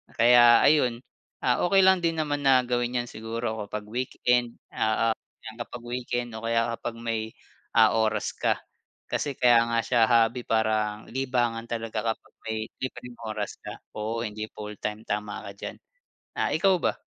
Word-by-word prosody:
Kaya 120 0 +7
ayun, 125 -6 +3 0.4
ah, 125 -1 +2
okey 195 +2 +5
lang 190 -1 +6
din 165 -1 +1
naman 145 -1 -2
na 130 -2 +5
gawin 120 0 0
yan 120 - -11
siguro 110 0 -4
kapag 105 +1 -5
weekend, 125 0 0 0.2
oo, 110 +1 +1 0.5
kapag 120 0 -7
weekend 120 0 -3
o 110 - -7
kaya 115 0 +1
kapag 120 -1 -4
may 115 -1 -3 0.5
ah, 110 -1 +7
oras 110 -1 0
ka. - - +1 0.5
Kasi 140 -3 -2
kaya 120 -2 +6
nga 115 0 +1
siya 115 -3 +3
hobby 115 +1 +3
parang 110 -1 +1
libangan 120 -3 -1
talaga 115 -2 -3
kapag - - -28
may 110 0 -2
libreng 125 -1 -6
oras 105 -1 -3
ka. - - -7 0.2
Oo, 115 +2 -2
hindi 110 +1 -5
fulltime, 105 +1 -6
tama 105 0 -3
ka - - -7
diyan. - - -7 0.6
Ah, - - 0
ikaw 190 +3 +4
ba? - - 0
115 Hz, 160 wpm, -26 LUFS, 110-125 Hz, 0.6 s, Kaya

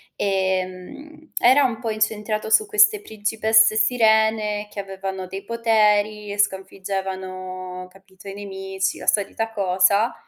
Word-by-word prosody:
Ehm, 190 +11 -3
era 260 +4 +5
un 240 -4 -1
po' 230 -1 -4
incentrato 215 0 -2
su 430 - +5
queste 420 0 +4
principesse 220 - +2
sirene 220 -3 +2
che 205 - -5
avevano 190 -1 -6
dei 195 +2 -8
poteri 215 -2 +1
e 205 - -6
sconfiggevano, 185 -2 -4
capito, 190 +1 -18
i 195 - -6
nemici, 190 -2 -4
la - - -10
solita 220 +2 0
cosa, 200 +2 +2
205 Hz, 125 wpm, -22 LUFS, 190-220 Hz, -, era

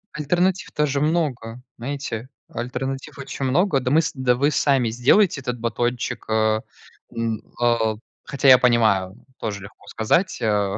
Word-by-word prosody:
Альтернатив 175 +5 0
тоже 145 -2 0
много, 145 -8 -1 0.2
знаете, 130 -2 -5 0.2
альтернатив 130 +3 -5
очень 140 0 -5
много. 150 +3 +2
Да 125 -1 -2
мы 155 +5 +4
с 155 - -2
да 130 -2 +1
вы 140 +4 +2
сами 135 -6 +2
сделайте 140 - +3
этот 125 -2 -4
батончик, 120 +1 -2
а. 110 0 +2 0.5
М, 115 -2 -3 0.2
а, 115 -2 +2 0.3
хотя 140 0 -1
я 130 -1 +9
понимаю, 110 -6 +2 0.2
тоже 100 -3 -4
легко 100 - -14
сказать, 165 - 0
а, 105 -2 +1
125 Hz, 145 wpm, -22 LUFS, 115-140 Hz, 0.5 s, я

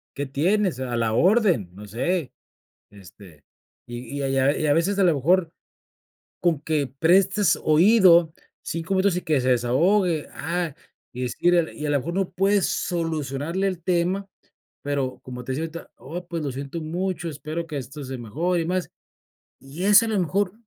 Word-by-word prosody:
¿qué 145 - -3
tienes?, 170 +3 0
a 125 -2 -3
la 115 -1 0
orden 185 - +3
no 105 +3 -11
sé, 135 - -2 0.6
este, 90 -5 -16 0.4
y 120 +3 -7
y, - - -3
a 135 - -1
y 135 0 0
a 135 +2 +3
y 155 - 0
a 145 - +4
veces 175 +6 +1
a 195 - +4
lo 170 -3 +4
mejor, 165 +4 +2 0.9
con 170 -4 +2
que 155 -3 -1
prestes 175 - +3
oído 170 0 +5 0.3
5 165 +4 -3
minutos 190 -1 +2
y - - -2
que 150 -6 +1
se 130 - 0
desahogue, 155 - +2
ah, 170 -4 -3 0.4
y 125 +1 -4
es 120 - -4
ir 175 -2 +3
y 150 - -5
a - - -1
lo 145 - +3
mejor, 170 +6 -5
no 190 0 -1
puedes 195 +2 +2
solucionarle 165 +1 -2
el 185 -3 -3
tema, 180 +2 0 0.6
pero, 140 -3 -2
como 125 -1 -8
te 130 - -4
decía 150 +5 -2
ahorita: 165 +1 -9
"Oh 175 +6 -7
pues, 170 -2 -4
lo 140 - -2
siento 140 +5 -6
mucho 175 +2 -3
espero 155 +3 -5
que 155 -3 -5
esto 140 +3 -7
se 130 0 -6
mejore 165 - -1
y - - -5
más". 180 +1 -2 0.7
Y 140 +7 -8
eso 205 +2 +7
a - - -3
lo 215 -3 +1
mejor, 185 +2 0
160 Hz, 185 wpm, -24 LUFS, 135-180 Hz, 0.9 s, eso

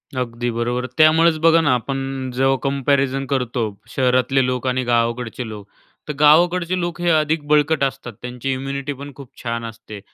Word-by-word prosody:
अगदी 120 -1 -2
बरोबर. 120 +2 -2
त्यामुळेच 160 +1 +5
बघा 165 +1 +5
ना, 145 -5 +2
आपण 135 +1 -4
जेव्हा 135 +1 +2
कम्पॅरिझन 135 -1 0
करतो. 125 -3 -1 0.3
शहरातले 130 0 +2
लोक 125 0 -2
आणि 130 0 0
गावाकडचे 120 0 -1
लोक, 105 -2 -9 0.4
तर 150 - -3
गावाकडचे 175 +4 +4
लोक 175 -1 -4
हे 175 - +1
अधिक 155 0 +1
बळकट 150 0 +2
असतात. 130 -3 -3
त्यांची 125 +2 -4
इम्युनिटी 140 +2 -4
पण 145 0 -8
खूप 140 -3 -12
छान 115 -1 -3
असते 110 -2 -9
135 Hz, 160 wpm, -20 LUFS, 125-150 Hz, 0.4 s, त्यामुळेच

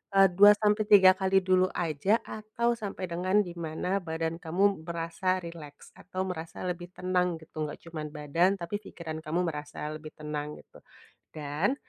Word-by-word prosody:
eee, 195 0 +8
2-3 205 0 +6
kali 190 0 +3
dulu 185 0 +4
aja 175 +6 +1
atau 220 +2 -2
sampai 200 -4 -4
dengan 185 +4 +2
di 175 - -6
mana 170 +4 -2
badan 165 -1 -3
kamu 190 +1 +1
merasa 170 +2 -1
rileks, 155 -4 -10
atau 185 +1 -4
merasa 165 -1 -6
lebih 175 -1 -3
tenang, 180 -1 0
gitu. 155 -1 -5
Gak - - -8
cuman 155 -2 -5
badan 165 +6 +1
tapi 170 +4 -3
pikiran 160 -4 -7
kamu 165 +3 -1
merasa 150 -1 -5
lebih 155 0 -8
tenang 150 -1 -4
gitu, - - -17 0.6
dan 155 - 0
175 Hz, 150 wpm, -29 LUFS, 160-195 Hz, 0.6 s, eee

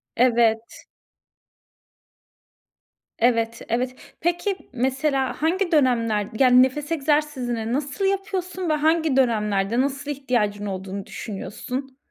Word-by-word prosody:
Evet. 230 -2 +2 2.3
Evet, 230 -1 +1
evet. 250 +2 -1 0.3
Peki 350 +4 0 0.2
mesela 265 +2 0
hangi 350 +3 +1
dönemler, 230 -8 +2
yani, 255 -1 +7
nefes 290 +4 -2
egzersizini 275 -7 0
nasıl 285 +8 -2
yapıyorsun 375 -2 -2
ve - - +3
hangi 315 -1 +2
dönemlerde, 215 -3 +2
nasıl 280 +2 -2
ihtiyacın 230 -7 -1
olduğunu 195 0 -5
düşünüyorsun? 250 +6 -6
260 Hz, 95 wpm, -23 LUFS, 230-300 Hz, 2.3 s, yani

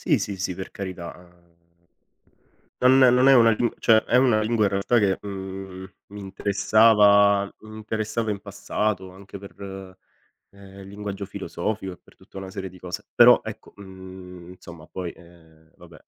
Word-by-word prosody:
Sì, - - +2
sì, 100 - -4
sì, 95 -1 -3
per 95 +1 -8
carità, 95 -3 -7
ehm, 85 -1 -21 1.2
non 130 +1 +5 0.2
non 125 +1 +4
è 135 - +7
una 115 -2 +5
giu 120 +2 0
cioè 115 - +4
è - - 0
una 120 -4 +3
lingua 110 0 0
in - - +2
realtà 100 +5 +1
che, 100 -4 +2
mhmm, 95 -1 -7 0.2
mi 105 +1 -11
interessava 100 0 +3
mi 110 0 -12
interessava 110 0 -3
in 100 - -4
passato 100 -1 -3
anche 100 +1 -12
per, 95 -1 -10 0.6
ehm, 100 0 -14
linguaggio 100 0 -7
filosofico 95 0 -5
e 90 - -13
per - - -23
tutta - - -19
una 95 -1 -8
serie 95 0 -6
di 90 0 -16
cose. 90 -1 -7
Però - - +7
ecco, - - -10
mhmm, 95 -2 -12
insomma 85 -3 -13
poi, 90 -1 -6
ehm, 80 -2 -21
vabbè 85 -3 -16
95 Hz, 165 wpm, -24 LUFS, 95-105 Hz, 1.2 s, è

